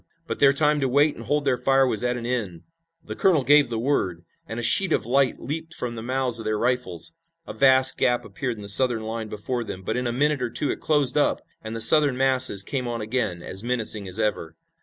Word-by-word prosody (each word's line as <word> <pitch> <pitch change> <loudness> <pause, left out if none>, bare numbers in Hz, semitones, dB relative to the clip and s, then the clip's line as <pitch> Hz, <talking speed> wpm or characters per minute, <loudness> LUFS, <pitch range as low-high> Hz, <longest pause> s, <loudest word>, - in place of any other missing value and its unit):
But - - -5
their 140 -1 +5
time 150 +1 +2
to 135 -2 -1
wait 145 +4 +2
and - - -11
hold 150 0 -1
their 130 -3 0
fire 135 +1 +2
was 110 -4 -1
at 125 0 -1
an 120 - -7
end. 105 -9 -4 0.4
The - - -8
colonel 175 -8 +2
gave 145 -1 +4
the 115 - -4
word, 95 -9 -2 0.2
and 110 - -6
a - - -5
sheet 190 +8 +3
of - - 0
light 130 +2 +1
leaped 160 +5 -6
from 120 -1 -5
the 115 - -7
mouths 125 0 -1
of 110 - -8
their 110 0 -1
rifles. 125 - -2 0.3
A - - -8
vast 130 -1 +4
gap 120 -1 0
appeared 125 -4 -5
in 105 - -10
the - - -9
Southern 115 +2 +4
line 110 0 -6
before 120 +4 -4
them, 95 -4 -8
but - - -3
in 125 0 -2
a - - -2
minute 145 +3 0
or 125 - -2
two 145 - 0
it - - -7
closed 145 -4 +1
up, 145 - +1 0.2
and 110 +1 -7
the 115 - -3
Southern 145 +2 +5
masses 130 -6 +3
came 130 +2 -4
on 120 -1 -4
again, 110 -6 -3
as 95 +3 -5
menacing 110 -4 0
as 95 +2 -3
ever. 105 -7 -3
125 Hz, 245 wpm, -23 LUFS, 110-135 Hz, 0.4 s, their